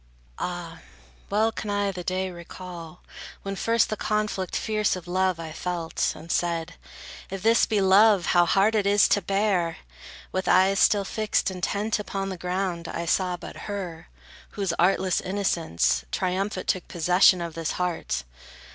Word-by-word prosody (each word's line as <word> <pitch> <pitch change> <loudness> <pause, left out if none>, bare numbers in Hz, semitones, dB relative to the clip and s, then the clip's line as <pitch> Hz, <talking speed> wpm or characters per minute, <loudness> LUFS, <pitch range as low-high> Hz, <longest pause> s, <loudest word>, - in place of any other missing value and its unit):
Ah, 175 -2 -5 0.5
well 220 +2 +2
can 215 - -6
I 205 -1 0
the 180 -2 -7
day 185 +1 -2
recall, 175 -1 -10 0.4
when 195 0 -4
first 230 +3 +2
The - - 0
conflict 210 -3 -2
fierce 215 -3 0
of 180 -1 -9
love 185 -1 +1
I 160 -1 -6
felt, 170 0 -2
and 165 +1 -8
said: 170 0 -1 0.6
If 190 -1 -6
this 230 +1 +4
be 215 -3 +1
love, 195 -1 +5
how 175 -1 +5
hard 195 +5 +3
it 210 -2 +1
is 205 0 +5
to 205 - +3
bear! 195 -3 0 0.5
With 185 -1 -2
eyes 190 +2 +4
still 200 -2 +4
fixed 215 -2 0
intent 200 +4 -1
upon 195 -1 -3
the 190 - -4
ground, 180 -1 -2
I 170 - -4
saw 180 +1 +1
but 175 - -9
her, 175 -5 -6 0.4
whose 195 -5 -2
artless 185 0 +2
innocence, 170 - 0
Triumphant 185 +1 -2
took 185 - 0
possession 180 +2 +4
of 170 -1 -4
this 165 -1 -3
heart. 180 - -2
185 Hz, 155 wpm, -25 LUFS, 175-200 Hz, 0.6 s, love